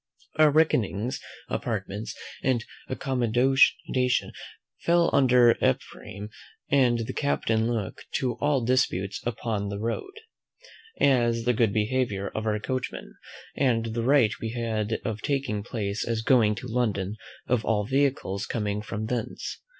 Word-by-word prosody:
Our 155 -1 +7
reckonings, 130 -6 +1 0.3
apartments, 105 -2 -4 0.2
and 125 -3 +1 0.2
accommodation, 130 0 +2 0.5
fell 170 0 +3
under 125 -3 +6
Ephraim; 110 -5 -2 0.4
and 120 -4 +3
the - - -5
captain 115 -5 0
looked 110 -5 -4
to 130 -4 0
all 145 -2 +2
disputes 105 -6 0
upon 110 -3 -2
the 100 - -4
road, 115 - -3 0.9
as 120 -4 +3
the 125 +1 +2
good 115 -2 +2
behaviour 105 -2 0
of 110 0 -4
our 105 0 +1
coachman, 130 +3 -4 0.4
and 115 -4 +1
the 115 - -1
right 125 -3 +4
we 115 0 -3
had 110 -2 -1
of 110 -1 -3
taking 135 -7 -1
place 105 -2 -3
as 115 -1 -2
going 110 -4 +4
to 120 +4 -7
London 110 -5 -1 0.3
of 125 -3 +1
all 105 -2 +1
vehicles 130 -6 0
coming 105 -2 -2
from 110 0 -4
thence. 120 0 -4
115 Hz, 130 wpm, -26 LUFS, 105-130 Hz, 0.9 s, Our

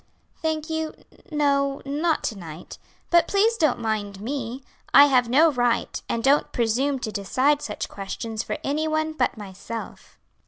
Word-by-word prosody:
"Thank 315 -1 -1
you, 320 0 -2 0.3
no; 280 -2 +1
not 305 +4 0
to 220 - -2
night. 165 -3 -10 0.3
But 340 -1 +5
please 435 +3 +3
don't 310 - +2
mind 210 -3 -3
me. 250 +2 -4 0.3
I 285 - +10
have 250 -4 +3
no 310 +6 +5
right, 245 -3 0
and 230 - -1
don't 280 +2 +3
presume 250 +5 +1
to 235 -4 -4
decide 260 +9 +1
such 210 - -4
questions 220 +3 -5
for - - -4
anyone 310 +2 0
but 255 -6 0
myself." 205 +3 -8
270 Hz, 150 wpm, -24 LUFS, 225-310 Hz, 0.3 s, I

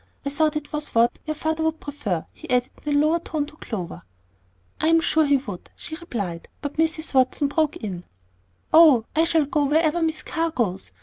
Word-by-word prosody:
I 280 - -1
thought 305 +1 +1
it 300 -1 -5
was 300 -4 -4
what 230 +1 +3
your 310 - -1
father 315 +1 -1
would 320 0 0
prefer," 225 - -3
he - - -12
added 250 0 +1 0.2
in 290 - +2
a - - +5
lower 310 +3 +3
tone 310 -3 -3
to 300 - -14
Clover. 180 - -6 0.8
"I 315 - +1
am 330 0 +5
sure 315 -1 +2
he 280 0 +5
would," 205 -9 -8
she 315 - -8
replied; 205 - -5
but 285 0 -6
Mrs. 320 -1 0
Watson 265 +2 +2
broke 310 0 +1
in, 185 -5 -6 0.7
"Oh, 305 -9 +7
I 320 +1 +4
shall 325 -3 +2
go 290 +1 +1
wherever 315 +3 +2
Miss 315 -2 -1
Carr 330 0 -1
goes. 200 - -2
295 Hz, 200 wpm, -24 LUFS, 250-315 Hz, 0.8 s, Oh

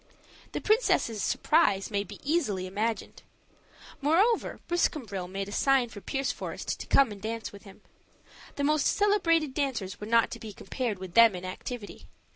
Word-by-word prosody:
The - - -3
princess' 420 - +2
surprise 220 -12 +2
may 200 -1 0
be 200 - -11
easily 275 - 0
imagined. 215 +4 -3 0.8
Moreover, 375 +11 +2
Briscambril 235 - -1
made 195 +1 -4
a - - -8
sign 265 +1 +2
for 205 -3 -10
Pierceforest 270 +7 -3
to - - -7
come 275 -5 +4
and 200 -1 -9
dance 225 +1 -4
with 200 +1 -13
him. 195 - -14 0.7
The 285 - -2
most 300 0 +2
celebrated 335 -8 +2
dancers 240 -10 -2
were 210 - -6
not 230 0 +3
to - - -6
be 215 -2 -8
compared 235 -2 -3
with 185 -2 -8
them 230 -4 +7
in 180 0 -6
activity. 205 +4 -7
230 Hz, 160 wpm, -28 LUFS, 200-295 Hz, 0.8 s, them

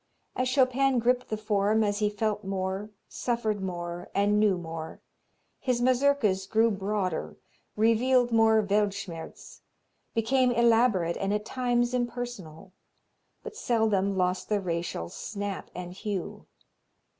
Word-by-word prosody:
As 255 0 0
Chopin 260 0 +3
gripped 250 +1 +1
the 215 - -2
form, 210 0 +1
as 205 -1 0
he 210 -1 +2
felt 210 0 -2
more, 190 +1 -3 0.2
suffered 220 -4 -2
more 175 -1 -5
and 205 +1 +3
knew 210 -3 +3
more, 165 -2 -7 0.6
his 250 -2 0
Mazurkas 250 -6 +2
grew 225 +2 +3
broader, 195 -3 -2 0.4
revealed 240 +3 +3
more 220 -1 +4
Weltschmerz, 200 -4 -3 0.5
became 250 +3 +2
elaborate 230 -7 +3
and 195 0 -1
at 210 0 -1
times 245 -1 0
impersonal, 240 -9 -4 0.7
but 455 -2 -8
seldom 215 - +1
lost 180 0 0
the 210 -1 +2
racial 170 - -3
"snap" 200 - -5
and 180 0 -6
hue. 195 -2 -5
210 Hz, 120 wpm, -28 LUFS, 190-240 Hz, 0.7 s, more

